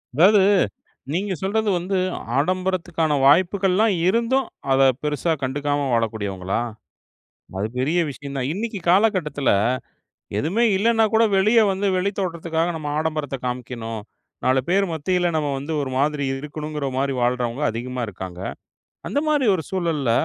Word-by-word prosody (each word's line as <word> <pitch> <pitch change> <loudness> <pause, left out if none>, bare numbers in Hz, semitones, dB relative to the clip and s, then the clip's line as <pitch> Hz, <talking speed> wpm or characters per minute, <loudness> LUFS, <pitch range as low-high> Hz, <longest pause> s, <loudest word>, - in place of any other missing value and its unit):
அதாவது, 195 +7 +6 0.7
நீங்க 190 +3 -1
சொல்றது 210 +3 0
வந்து 185 +3 -2 0.4
ஆடம்பரத்துக்கான 175 -1 0
வாய்ப்புகல்லாம் 190 +7 +4
இருந்தும், 235 +6 +2 0.3
அத 135 0 +4 0.2
பெருசா 150 +3 0
கண்டுக்காம 145 +2 -1
வாழக்கூடியவங்களா? 100 -5 -1 1.0
அது 105 - 0
பெரிய 155 +7 +1
விஷயம் 140 0 -8
தான். 130 -1 -1
இன்னிக்கு 215 +2 -3
காலகட்டத்துல, 180 - +2 0.9
எதுமே 185 - +1
இல்லனாகூட 225 +1 +3
வெளிய 215 +5 +4
வந்து 195 +1 -1
வெளி 190 +2 0
தோற்றத்துக்காக 170 -2 -1
நம்ம 150 -2 -5
ஆடம்பரத்த 155 -3 -2
காமிக்கணும். 120 -3 -4 0.4
4 130 +1 +3
பேர் 195 +2 +3
மத்தியில 175 +3 0
நம்ம 150 -2 0
வந்து 145 +4 -4
ஒரு 135 -2 -4
மாதிரி 145 +1 +1 0.2
இருக்கணுங்கற 150 0 -5
மாரி 135 +1 0
வாழ்றவங்க 125 +2 0
அதிகமா 125 +3 -4
இருக்காங்க. 90 -3 -7 0.7
அந்த - - -1
மாரி 295 -4 +2
ஒரு 160 - -5
சூழல்ல, 165 -9 0
155 Hz, 125 wpm, -22 LUFS, 135-190 Hz, 1.0 s, அதாவது